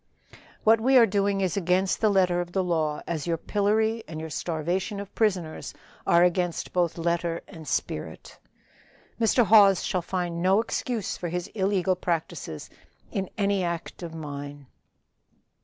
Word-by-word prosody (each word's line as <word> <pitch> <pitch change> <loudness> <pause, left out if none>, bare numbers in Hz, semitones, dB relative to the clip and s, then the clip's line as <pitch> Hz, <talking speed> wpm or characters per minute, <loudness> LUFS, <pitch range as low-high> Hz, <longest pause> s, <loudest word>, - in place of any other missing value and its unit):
"What 220 +1 +5
we 260 +3 +5
are 235 - +8
doing 200 -1 0
is 185 -3 0
against 185 0 +1
the 220 - +4
letter 180 -3 +3
of 175 0 -7
the 190 - +1
law, 160 -4 -1
as 165 -1 -3
your 165 -1 0
pillory 220 +4 0
and 155 -1 -6
your 160 0 -6
starvation 175 +6 -2
of 200 -1 -8
prisoners 185 -8 -1 0.3
are 170 +1 +5
against 180 -1 0
both 175 -2 +1
letter 170 0 -1
and 160 -5 -11
spirit. - - -4 0.8
Mr. 230 +1 +3
Hawes 200 -3 +6
shall 180 - -1
find 175 -1 -3
no 190 +3 +4
excuse 230 -1 -2
for 175 - -4
his 175 +1 -3
illegal 190 -2 +1
practices 165 - -3 0.4
in 190 -2 -3
any 200 -2 +1
act 170 0 -4
of 165 -2 -7
mine." 145 -2 -7
180 Hz, 155 wpm, -26 LUFS, 170-200 Hz, 0.8 s, are